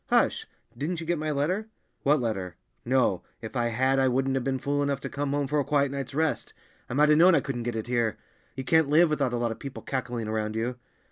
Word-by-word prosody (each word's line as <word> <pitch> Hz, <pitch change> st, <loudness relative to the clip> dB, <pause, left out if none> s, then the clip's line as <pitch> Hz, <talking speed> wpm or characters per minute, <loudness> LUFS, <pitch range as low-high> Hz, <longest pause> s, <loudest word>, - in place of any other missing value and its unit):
"Hush! -, -, +2 dB, 0.3 s
Didn't 160 Hz, +7 st, -3 dB
you 165 Hz, -, -6 dB
get 170 Hz, -1 st, 0 dB
my 155 Hz, 0 st, -2 dB
letter?" 165 Hz, +9 st, 0 dB, 0.3 s
"What 145 Hz, +2 st, +3 dB
letter? 95 Hz, -7 st, -3 dB, 0.3 s
No, 125 Hz, -7 st, +2 dB, 0.2 s
if 110 Hz, +3 st, -8 dB
I 120 Hz, -1 st, +1 dB
had 130 Hz, +3 st, +2 dB
I 135 Hz, -, +4 dB
wouldn't 135 Hz, +1 st, +1 dB
have 135 Hz, -2 st, 0 dB
been 135 Hz, 0 st, 0 dB
fool 145 Hz, +2 st, -1 dB
enough 140 Hz, -1 st, 0 dB
to -, -, -5 dB
come 145 Hz, 0 st, -2 dB
home 145 Hz, 0 st, 0 dB
for 150 Hz, +2 st, 0 dB
a -, -, +2 dB
quiet 140 Hz, -1 st, +1 dB
night's 140 Hz, -1 st, -5 dB
rest; 160 Hz, 0 st, -1 dB, 0.3 s
I 120 Hz, -, -3 dB
might 150 Hz, +2 st, +5 dB
have 150 Hz, 0 st, +5 dB
known 180 Hz, +1 st, +7 dB
I -, -, +5 dB
couldn't 130 Hz, -4 st, -4 dB
get 120 Hz, 0 st, -3 dB
it 110 Hz, -, -3 dB
here. 120 Hz, -2 st, 0 dB, 0.4 s
You 130 Hz, -, -4 dB
can't 160 Hz, +1 st, +3 dB
live 160 Hz, +2 st, +5 dB
without 140 Hz, -4 st, +1 dB
a 120 Hz, -, -1 dB
lot 120 Hz, -1 st, 0 dB
of 110 Hz, -, -7 dB
people 135 Hz, -1 st, -7 dB
cackling 120 Hz, -4 st, -3 dB
around 110 Hz, 0 st, -2 dB
you." 120 Hz, +3 st, -2 dB
135 Hz, 250 wpm, -27 LUFS, 120-145 Hz, 0.4 s, known